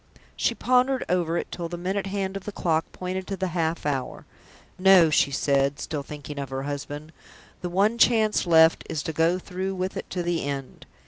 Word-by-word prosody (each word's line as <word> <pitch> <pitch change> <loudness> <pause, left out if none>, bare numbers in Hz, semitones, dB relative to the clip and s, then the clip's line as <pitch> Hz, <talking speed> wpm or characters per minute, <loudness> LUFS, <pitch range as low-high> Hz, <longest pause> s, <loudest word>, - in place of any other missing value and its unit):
She - - 0
pondered 255 +1 +2
over 175 -2 +1
it - - -4
till 170 -1 -5
the 175 - -5
minute 190 +3 -2
hand 195 -1 -3
of 195 - -6
the 210 - -4
clock 165 -4 -1
pointed 185 +1 -5
to 195 - -4
the 190 0 -1
half 165 -2 -1
hour. 135 -3 -3 0.5
"No!" 185 -4 +6
she 150 - +3
said, 140 0 +1
still 150 -3 -4
thinking 145 0 -8
of 140 -2 -4
her 135 0 -4
husband. 145 +2 -5 0.5
"The 180 - -3
one 205 +6 +2
chance 220 -5 +3
left 160 -1 +5
is 150 - -2
to 160 - -4
go 165 +3 +2
through 190 +1 -4
with 185 +1 -3
it - - -6
to 180 - -3
the 170 -1 -1
end. 140 -1 -5
175 Hz, 200 wpm, -25 LUFS, 150-190 Hz, 0.5 s, No